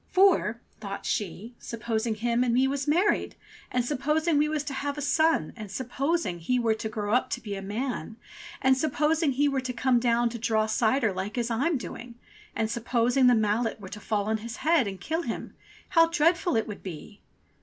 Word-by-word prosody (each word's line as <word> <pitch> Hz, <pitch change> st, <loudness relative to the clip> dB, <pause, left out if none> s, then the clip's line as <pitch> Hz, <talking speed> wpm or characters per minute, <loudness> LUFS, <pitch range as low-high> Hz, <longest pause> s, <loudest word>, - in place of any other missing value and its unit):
"For," 365 Hz, -, +3 dB, 0.2 s
thought 200 Hz, -1 st, -6 dB
she, 210 Hz, +4 st, -3 dB
"supposing 225 Hz, -1 st, -2 dB
him 235 Hz, +2 st, +1 dB
and 240 Hz, -2 st, +1 dB
me 260 Hz, +2 st, +4 dB
was 275 Hz, +1 st, -2 dB
married, 355 Hz, +8 st, +2 dB, 0.4 s
and 250 Hz, -1 st, 0 dB
supposing 300 Hz, +4 st, +1 dB
we 300 Hz, +1 st, +2 dB
was 305 Hz, -2 st, -1 dB
to 290 Hz, -2 st, -5 dB
have 285 Hz, +2 st, -3 dB
a -, -, -3 dB
son, 315 Hz, -, +2 dB
and 215 Hz, -3 st, -8 dB
supposing 260 Hz, -, -2 dB
he 250 Hz, +10 st, 0 dB
were 230 Hz, -2 st, +2 dB
to 220 Hz, 0 st, -4 dB
grow 210 Hz, -1 st, -2 dB
up 250 Hz, -, +2 dB
to -, -, -2 dB
be 205 Hz, -3 st, -5 dB
a 195 Hz, -, -5 dB
man, 225 Hz, +3 st, -4 dB, 0.5 s
and 265 Hz, 0 st, +5 dB
supposing 305 Hz, +2 st, +1 dB
he 290 Hz, +3 st, +2 dB
were 275 Hz, -2 st, 0 dB
to 255 Hz, -1 st, -4 dB
come 250 Hz, 0 st, +2 dB
down 235 Hz, 0 st, +2 dB
to 235 Hz, 0 st, -7 dB
draw 220 Hz, -1 st, +1 dB
cider 225 Hz, 0 st, +1 dB
like 195 Hz, +5 st, -4 dB
as 240 Hz, 0 st, -1 dB
I'm 280 Hz, +7 st, +1 dB
doing, 240 Hz, -1 st, -8 dB, 0.4 s
and 220 Hz, -, 0 dB
supposing 240 Hz, +2 st, +2 dB
the 245 Hz, -, +6 dB
mallet 220 Hz, +1 st, 0 dB
were 190 Hz, -2 st, -9 dB
to 210 Hz, -, -8 dB
fall 210 Hz, -1 st, -1 dB
on 220 Hz, +1 st, 0 dB
his 230 Hz, +2 st, -7 dB
head 315 Hz, -8 st, +4 dB
and 190 Hz, -1 st, -6 dB
kill 320 Hz, -, -2 dB
him, -, -, -5 dB, 0.4 s
how 330 Hz, -1 st, +5 dB
dreadful 335 Hz, +2 st, +2 dB
it 225 Hz, -, +1 dB
would 210 Hz, -, -7 dB
be!" 190 Hz, +3 st, -9 dB
240 Hz, 205 wpm, -27 LUFS, 220-285 Hz, 0.5 s, the